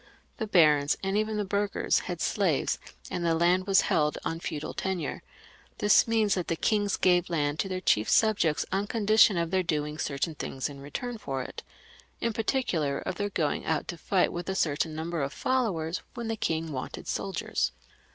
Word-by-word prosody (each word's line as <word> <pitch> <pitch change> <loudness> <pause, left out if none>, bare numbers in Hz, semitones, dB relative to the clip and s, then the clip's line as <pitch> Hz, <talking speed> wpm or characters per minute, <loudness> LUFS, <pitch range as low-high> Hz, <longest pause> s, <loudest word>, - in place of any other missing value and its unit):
The 220 - -3
barons 150 -6 +4
and 195 +1 0
even 215 0 0
the 210 - -1
burghers 200 +1 +1
had - - -4
slaves, - - +1 0.3
and 175 - -2
the 165 -1 +2
land 180 +3 +2
was 195 0 +5
held 150 -1 +1
on 165 - -2
feudal 155 -2 -4
tenure; 185 -6 -3 0.6
this 210 +2 +5
means 220 -3 +2
that 180 -3 -2
the 165 - 0
kings 205 +2 +1
gave 180 -1 +3
land 150 -3 0
to 195 - -1
their 185 -1 -2
chief 105 - +2
subjects 200 -9 +3
on 195 +2 0
condition 215 -3 +4
of 170 0 -1
their 190 -1 +3
doing 150 -3 -2
certain 140 +4 -1
things 135 -2 -4
in 140 -1 -10
return 230 - -5
for 135 -8 -3
it; - - -8 0.6
in 230 -1 -1
particular, 190 - 0
of - - -3
their 205 +3 -2
going 155 -7 -1
out 160 -1 0
to - - -3
fight 180 +3 +1
with 175 +2 -4
a 190 - -1
certain 155 -2 0
number 165 0 -3
of 140 +1 -2
followers, 185 -10 -1
when 235 -2 -4
the 225 - 0
king 165 -5 -2
wanted 130 -2 -6
soldiers. - - -1
175 Hz, 190 wpm, -28 LUFS, 155-205 Hz, 0.6 s, was